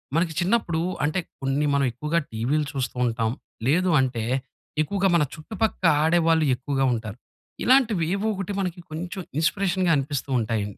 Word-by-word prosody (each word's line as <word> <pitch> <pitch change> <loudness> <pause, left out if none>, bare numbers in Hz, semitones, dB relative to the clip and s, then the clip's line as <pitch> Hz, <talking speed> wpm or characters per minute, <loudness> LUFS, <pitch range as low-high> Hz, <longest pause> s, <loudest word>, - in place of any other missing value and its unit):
మనకి 165 0 +1
చిన్నప్పుడు 175 -3 +1 0.2
అంటే, 155 +5 +1 0.2
కొన్ని 135 +2 0
మనమెక్కువగా 140 +4 +1
టీవీలు 130 +8 0
చూస్తూ 130 -3 -3
ఉంటాం. 115 -1 0 0.4
లేదు 180 +6 +3
అంటే, 125 -4 -1 0.6
ఎక్కువగా 195 +6 +1
మన 165 - +4
చుట్టుపక్క 220 +6 -3 0.2
ఆడేవాళ్ళు 165 -1 +3
ఎక్కువగా 135 +1 -1
ఉంటారు. 110 -2 -5 0.5
ఇలాంటివి 235 -9 +4
ఏవోకటి 200 -1 -2
మనకి 180 -2 -2
కొంచెం 175 +4 -5 0.2
ఇన్స్‌పిరేషన్‌గా 185 +1 +1
అనిపిస్తూ 140 0 -3
ఉంటాయండి. 105 -3 -2
155 Hz, 130 wpm, -25 LUFS, 130-185 Hz, 0.6 s, మన